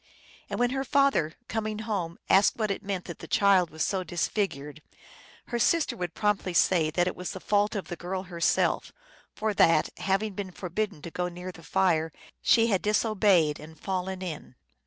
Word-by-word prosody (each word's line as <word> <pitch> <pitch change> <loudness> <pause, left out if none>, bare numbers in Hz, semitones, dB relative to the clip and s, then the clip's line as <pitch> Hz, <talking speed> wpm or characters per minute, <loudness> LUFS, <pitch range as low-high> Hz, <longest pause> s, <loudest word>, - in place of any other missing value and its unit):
And - - -3
when 245 0 +2
her 270 0 -1
father, 275 - +2
coming 215 -1 -2
home, 200 -6 -3
asked 195 +1 +5
what 215 -3 0
it 195 - -3
meant 195 -3 -4
that 170 - -8
the 165 - -9
child 190 -3 +4
was 155 +1 -2
so 190 -2 -1
disfigured, 160 -4 -2 0.7
her 240 - -1
sister 300 0 +2
would 180 -5 -5
promptly 205 -4 0
say 165 -3 +4
that 175 +3 +1
it 185 - -2
was 180 - -5
the 190 - -6
fault 205 +3 +1
of 200 - -3
the 175 - -5
girl 185 +2 -4
herself, 175 -3 0 0.4
for 215 -1 -1
that, 165 -5 +4
having 195 +2 0
been 195 0 -5
forbidden 185 -1 -4
to 170 - -7
go 180 +1 -2
near 180 +1 -7
the 170 - -14
fire, 165 -2 +1 0.3
she 230 -1 +5
had 200 -5 +1
disobeyed 205 -7 +2
and 160 +1 -12
fallen 190 0 -3
in. 155 -7 -7
190 Hz, 185 wpm, -28 LUFS, 170-210 Hz, 0.7 s, asked